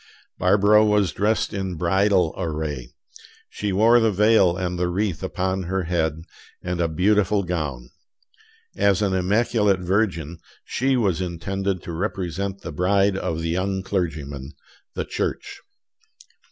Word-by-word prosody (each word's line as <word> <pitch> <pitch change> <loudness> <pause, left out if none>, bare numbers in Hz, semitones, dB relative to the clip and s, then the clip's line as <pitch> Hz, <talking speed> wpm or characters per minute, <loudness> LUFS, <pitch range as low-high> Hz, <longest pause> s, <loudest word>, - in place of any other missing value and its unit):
Barbara 105 +3 +5
was 105 -3 +2
dressed 105 +3 0
in 95 -2 -3
bridal 90 +1 +2
array. 75 -7 -4 0.6
She 105 -1 -3
wore 115 +5 +5
the 115 -1 +3
veil 100 -3 +4
and 90 -1 -3
the 90 - +1
wreath 95 0 -1
upon 95 0 -2
her 95 +1 -1
head, 80 -2 -1 0.4
and 90 -1 -2
a 85 - +2
beautiful 100 +4 +2
gown. 75 -9 -4 0.8
As 100 0 +2
an 100 -2 +1
immaculate 100 +1 +2
virgin, 90 -4 -1 0.3
she 135 0 0
was 95 -7 +1
intended 95 +2 -3
to - - -6
represent 95 +1 -3
the 85 - -6
bride 95 +5 +2
of 80 -4 -3
the 80 - -1
young 95 +2 -1
clergyman, 75 -7 -3 0.4
the - - -2
Church. - - -4
95 Hz, 135 wpm, -23 LUFS, 85-100 Hz, 0.8 s, Barbara